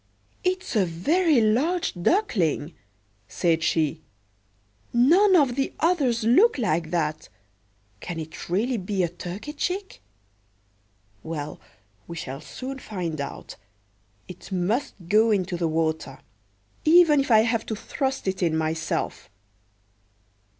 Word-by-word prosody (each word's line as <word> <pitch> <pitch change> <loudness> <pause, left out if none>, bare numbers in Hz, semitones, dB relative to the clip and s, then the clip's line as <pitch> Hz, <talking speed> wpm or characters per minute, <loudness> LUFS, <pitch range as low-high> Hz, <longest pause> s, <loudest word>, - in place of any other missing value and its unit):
"It's 370 -6 -1
a 210 - +4
very 285 - +2
large 280 +12 +1
duckling," 175 - 0 0.5
said 165 -2 +1
she; 160 -1 0 0.9
"none 350 +12 +5
of 280 -7 +4
the 270 0 -1
others 280 -10 +1
look 330 - +5
like 170 -9 0
that: 155 -3 -2 0.7
can 175 - -6
it 160 +1 -8
really 230 +8 0
be 190 -1 -1
a 170 - 0
turkey 180 - -7
chick? 370 +6 -4 1.2
Well, 150 0 -6 0.5
we 170 - -7
shall 135 -3 -6
soon 270 +1 -7
find 175 - -4
out. 140 - -7 0.7
It 180 +2 -11
must 190 +9 -1
go 215 +4 +4
into 190 -3 0
the 170 -1 0
water, 160 -3 -1 0.7
even 320 -2 +6
if 275 - -1
I 220 -2 +7
have 225 0 0
to 220 - -2
thrust 265 +3 -3
it 190 0 -2
in 165 -3 +1
myself." 160 0 -2
205 Hz, 120 wpm, -25 LUFS, 165-275 Hz, 1.2 s, I